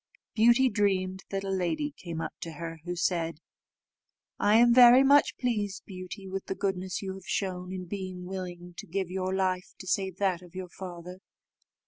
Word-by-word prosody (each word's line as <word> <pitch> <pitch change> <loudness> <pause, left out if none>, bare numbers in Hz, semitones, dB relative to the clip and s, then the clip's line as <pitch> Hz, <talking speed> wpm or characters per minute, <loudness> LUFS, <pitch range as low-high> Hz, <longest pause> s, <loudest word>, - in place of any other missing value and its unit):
Beauty 240 +4 +5
dreamed 190 -4 0
that 195 0 -3
a 195 - -3
lady 275 - -1
came 165 -2 -6
up - - -4
to 165 - -6
her, 165 +1 -6
who 175 0 -3
said, 170 -3 0 1.0
"I 205 +1 +4
am 240 +1 +6
very 250 +1 +9
much 285 +1 +5
pleased, 210 -6 -1
Beauty, 190 +1 -8
with 190 0 -4
the 190 - -2
goodness 190 -1 -2
you 190 -1 -3
have 190 -2 -11
shown, 180 -2 -2
in 185 -1 -5
being 185 -1 -6
willing 180 -1 -6
to - - -8
give 185 +1 -2
your 185 0 -2
life 185 -1 -1
to - - -10
save 190 -1 -1
that 190 -3 +1
of 180 0 -16
your 185 -1 -5
father. 180 0 -8
190 Hz, 180 wpm, -29 LUFS, 180-200 Hz, 1.0 s, very